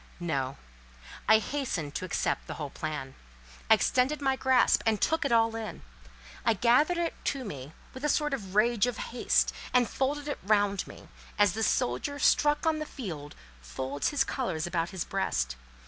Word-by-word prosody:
No. 135 -6 -2 0.7
I 220 - +8
hastened 215 - -3
to 185 - -3
accept 180 - -1
the - - -5
whole 145 -3 -5
plan. 150 -4 -5 0.6
I 220 - +9
extended 255 +7 +1
my 270 -2 +1
grasp 260 -1 +3
and 220 -2 +1
took 320 -1 +1
it 280 - 0
all 225 -1 +3
in. 225 -2 -6 0.6
I 230 - +3
gathered 255 - +3
it 340 -1 0
to 275 -2 -1
me 145 -6 -7 0.2
with 260 - -9
a 300 - +1
sort 295 0 +1
of 195 -7 -5
rage 230 +1 +3
of 245 -3 -3 0.2
haste, 245 - +2 0.2
and 250 -2 +4
folded 285 +2 -2
it 290 - -3
round 205 -1 +1
me, - - -12 0.3
as 205 -4 +4
the 225 - -3
soldier 170 - 0
struck 295 +1 +3
on 320 -1 +2
the 305 - -4
field 155 - -7 0.3
folds 130 - -3
his 290 - +2
colours 165 -12 -2
about 170 -1 -1
his 190 -3 -4
breast. 60 - -1
220 Hz, 180 wpm, -29 LUFS, 165-270 Hz, 0.7 s, I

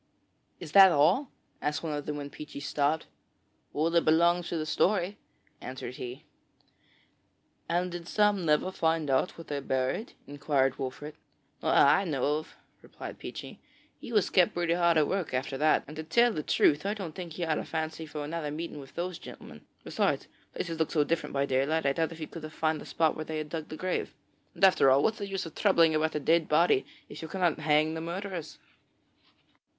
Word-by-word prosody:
'Is 170 -4 -8
that 195 0 +9
all?' 170 - +3 0.3
asked 150 +3 -2
one 160 -2 -2
of 145 -1 -4
them 150 - -3
when 145 -1 -6
Peechy 150 -2 -9
stopped. 145 +2 0 0.7
'All 160 +3 0
that 170 0 +3
belongs 170 +2 +3
to 170 - -2
the 155 - -2
story,' 185 +4 +1 0.4
answered 130 -1 -7
he. 125 +1 -7 1.4
'And 175 +2 0
did 175 -1 -7
Sam 205 -2 +2
never 155 +3 +2
find 160 -5 0
out 130 +7 +1
what 165 - -9
they 145 -1 -3
buried?' 130 - -2
inquired 140 -2 0
Wolfert. 135 +3 -5 0.5
'Not - - +1
that - - +7
I 195 - +4
know 150 -1 0
of,' 155 - -13 0.3
replied - - -9
Peechy; - - -8 0.4
'he - - -9
was 210 -4 +2
kept 180 -3 +4
pretty 175 -1 +1
hard 170 -1 +3
at 150 -2 +4
work 190 -8 -2
after 135 +2 -2
that, 155 +1 +3
and, 150 - -10
to 160 - -4
tell 235 +9 +3
the 155 - -2
truth, 145 0 +3
I 200 +2 -1
don't 185 -7 -6
think 175 -2 -7
he 175 - -4
had 160 -2 0
any - - -5
fancy 160 0 -4
for 150 0 -5
another 155 0 -3
meeting 155 0 -5
with 135 -1 -13
those 175 0 -3
gentlemen. - - -11 0.2
Besides, - - 0 0.3
places 165 -2 -4
look 160 - +1
so 150 -3 +2
different 165 +2 -2
by 140 0 +1
daylight 140 +4 +1
that 140 - +3
I - - +1
doubt 165 +2 -1
if 165 - -9
he 160 - -5
could 165 - -9
have 155 0 -8
found 155 -1 0
the - - -10
spot 160 -2 +1
where 155 - -5
they 160 0 -4
had 155 -1 -4
dug 160 -1 -5
the 155 - -8
grave. 185 +2 -2 0.4
And - - -7
after 185 -7 +6
all, 135 +2 +4
what 220 - +3
is - - -15
the 200 - -4
use 195 -2 -3
of 165 - -9
troubling 170 -6 +4
about 155 0 0
a - - +1
dead 165 +2 +2
body, 155 -3 +3 0.2
if 155 - -10
you 160 - -6
cannot 175 -2 0
hang 155 +1 +2
the 160 - -4
murderers?' 175 0 -5
160 Hz, 210 wpm, -29 LUFS, 150-175 Hz, 1.4 s, that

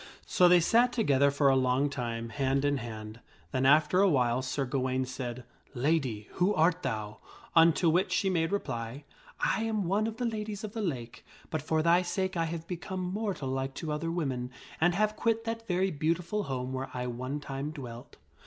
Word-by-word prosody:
( - - -31
So 180 - +4
they 175 0 +7
sat 235 +8 +4
together 140 - +3
for 140 0 +2
a 135 - +5
long 130 +2 +2
time, 115 -4 -4
hand 135 +3 0
in 145 0 +2
hand. 110 -2 -7 0.3
Then 130 -1 +2
after 155 +5 +5
a 200 - +5
while 125 -4 +2
Sir 135 +2 -2
Gawaine 130 0 -1
said, 125 -1 -5 0.2
" - - -39
Lady, 130 -6 0
who 190 +4 +1
art 165 +3 +3
thou?" 110 -6 -4 0.4
Unto 165 +1 +5
which 175 +4 +2
she 195 - +1
made 165 -3 +1
reply, 120 - -3 0.2
" - - -23 0.2
I - - -2
am 220 -2 0
one 200 +5 +1
of 225 0 -5
the 245 - -2
Ladies 215 -2 -3
of 215 -1 -6
the 225 - -3
Lake; 125 - -4 0.3
but 155 - -1
for 155 +1 0
thy 170 +2 +5
sake 190 +1 -2
I 165 -1 +1
have 165 0 -5
become 185 +2 -5
mortal 185 -6 -2
like 135 +1 -2
to 155 - -4
other 150 +2 -2
women 135 -8 -2 0.3
and 175 +1 +4
have 215 +2 +1
quit 225 0 0
that 225 0 -4
very 185 +1 +1
beautiful 170 +6 -1
home 130 -1 -3
where 130 0 -3
I 125 0 -2
one 130 +4 -4
time 140 0 -4
dwelt. 125 -6 -9
150 Hz, 205 wpm, -30 LUFS, 130-185 Hz, 0.4 s, they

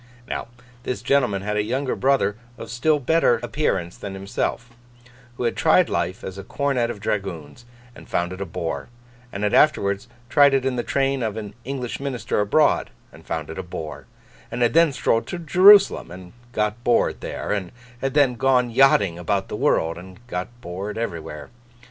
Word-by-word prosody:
Now, - - -4 0.3
this 125 - -4
gentleman 125 -9 +1
had 105 +1 -2
a 105 - +2
younger 130 +5 -1
brother 130 -7 +2 0.2
of - - -8
still 150 +6 +2
better 140 -4 +2
appearance 105 - -1
than 100 -1 -7
himself, 100 +5 -3 0.7
who - - -3
had 120 - 0
tried 165 +2 +4
life 90 +6 -2
as 95 +1 -7
a - - -7
Cornet 130 0 -1
of 115 - -5
Dragoons, 95 -1 -4 0.3
and - - -14
found 85 +1 -1
it 95 - -8
a - - -2
bore; 80 +4 -4 0.4
and 100 - -5
had 105 - +1
afterwards 100 -8 +3 0.2
tried 140 +2 +5
it 135 -1 0
in 135 -1 0
the 120 - 0
train 135 +2 0
of 110 -2 -2
an 105 -2 -6
English 125 -2 -4
minister 135 -6 -2
abroad, 105 +10 +2 0.2
and - - -16
found - - -4
it 80 - -7
a - - -4
bore; 80 -5 -7 0.4
and 120 +1 -1
had 120 - +2
then 165 -2 +5
strolled 120 -3 0
to 180 - -4
Jerusalem, 185 +5 +6
and 90 +1 -11 0.2
got 105 +1 -1
bored 120 -1 +2
there; - - -4
and 100 -4 -2 0.3
had 135 0 -2
then 140 -4 +4
gone 125 0 +2
yachting 105 -9 +4
about 90 - -1
the - - -4
world, 80 +1 +1
and 95 +1 -12
got 90 -6 -4
bored 100 +1 -5
everywhere. 85 -9 -5
115 Hz, 185 wpm, -23 LUFS, 95-135 Hz, 0.7 s, Jerusalem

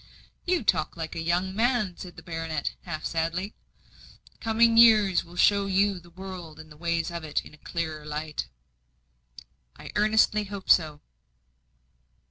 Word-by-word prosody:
"You 355 -6 +1
talk 160 -5 0
like 160 0 -5
a 165 - -3
young 175 +3 0
man," 225 -5 +1
said 180 -1 -10
the - - -12
baronet, 165 -3 -3
half 155 -3 -5
sadly. 165 +5 -2 0.9
"Coming 230 0 +3
years 215 -5 +6
will 170 0 -15
show 200 +2 +4
you 195 0 +2
the 175 0 -18
world 180 -3 -9
and 155 -1 -12
the - - -12
ways 170 +1 -1
of 170 -1 -5
it 155 -2 -2
in - - -13
a - - -15
clearer 160 -3 -4
light." 150 - -4 1.3
"I - - -10
earnestly 215 0 +3
hope 200 -1 -2
so." 155 -3 +3
175 Hz, 150 wpm, -27 LUFS, 160-205 Hz, 1.3 s, years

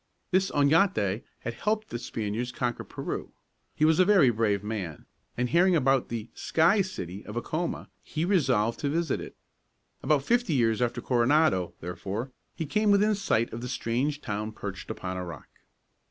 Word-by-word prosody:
This 190 +1 +3
Oñate 140 - +3 0.2
had 120 - -4
helped 215 - -1
the 120 - -3
Spaniards 115 +1 -3
conquer 120 -2 -2
Peru. - - -5 0.4
He 155 - +3
was 160 +1 +4
a - - +8
very 185 -10 +5
brave 105 -3 0
man, 100 -8 -5 0.3
and 125 +1 +1
hearing 180 +4 +4
about 135 -4 +2
the 115 -1 -4
"Sky 170 +6 +3
City" 100 - -5
of 105 +2 -6
Acoma, 160 +8 -3
he 160 +1 -3
resolved 130 - +2
to 145 - -1
visit 165 0 0
it. - - -9 0.7
About 150 -3 +2
fifty 240 - +2
years 115 -3 +2
after 120 0 0
Coronado, 120 - +2
therefore, 100 +8 -4 0.2
he 160 - -3
came 210 +8 +1
within 205 +1 +4
sight 120 - 0
of 115 - -5
the 125 - -5
strange 130 +5 -1
town 110 -3 -3
perched 100 -2 -7
upon 95 -4 -4
a 90 - -3
rock. 85 -4 -9
125 Hz, 170 wpm, -28 LUFS, 110-165 Hz, 0.7 s, a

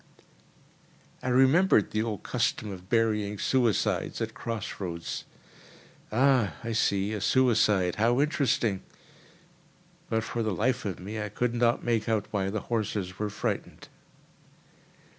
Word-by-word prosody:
I 130 - -2
remembered 135 - +4
the 110 - 0
old 110 -4 -3
custom 105 - -1
of 95 0 -10
burying 105 -3 +1
suicides 120 -2 +1
at - - -3
cross 115 -2 -5
roads: 85 -3 -5 0.9
"Ah! 120 - +3
I 115 - -3
see, 100 -2 +1
a 105 - -3
suicide. 105 -8 +3
How 120 +4 +3
interesting!" 130 -9 +1 1.3
But 115 -1 0
for 115 - -3
the 110 -4 -1
life 120 +6 0
of 95 -3 -3
me 105 +4 -5
I 105 - -3
could 120 +4 -1
not 120 0 +2
make 115 -2 0
out 110 -2 +1
why 95 -2 0
the 105 +1 -2
horses 105 -5 -3
were 105 0 -1
frightened. - - -4
110 Hz, 135 wpm, -28 LUFS, 100-120 Hz, 1.3 s, remembered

